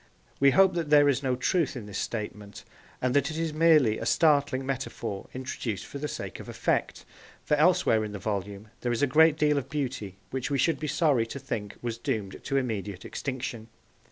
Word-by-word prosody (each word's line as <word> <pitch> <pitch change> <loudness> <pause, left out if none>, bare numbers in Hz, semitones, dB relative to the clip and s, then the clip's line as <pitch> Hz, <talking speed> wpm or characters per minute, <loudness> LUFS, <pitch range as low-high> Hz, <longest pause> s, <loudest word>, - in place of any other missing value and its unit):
We 140 - +6
hope 190 +6 +5
that 170 -3 -2
there 145 -1 +6
is 140 -1 +2
no 130 -2 0
truth 150 +3 0
in 120 -5 -6
this 100 -1 -5
statement, 105 -2 -5 0.4
and 130 -1 +2
that 140 -1 +3
it 155 - -5
is 165 -1 -1
merely 155 -8 +4
a - - -4
startling 145 -4 +3
metaphor 115 -6 -4
introduced 125 -5 -4
for 140 - -8
the 150 - -2
sake - - -6
of - - -9
effect, - - -1 0.4
for - - 0
elsewhere 155 -8 +4
in 105 - -5
the 105 - -5
volume 100 +1 -4
there 120 - -1
is 120 +4 0
a - - +7
great 155 +3 +5
deal 150 -2 +3
of 135 0 -9
beauty 130 -10 -4
which 130 -1 -3
we 140 - 0
should 145 +2 +2
be 155 - -3
sorry 140 -7 +2
to 125 - -6
think 110 -7 -5
was 115 -1 -3
doomed 100 -4 -3
to 135 - 0
immediate 105 -7 -3
extinction. 130 -4 -5
130 Hz, 205 wpm, -28 LUFS, 110-150 Hz, 0.4 s, a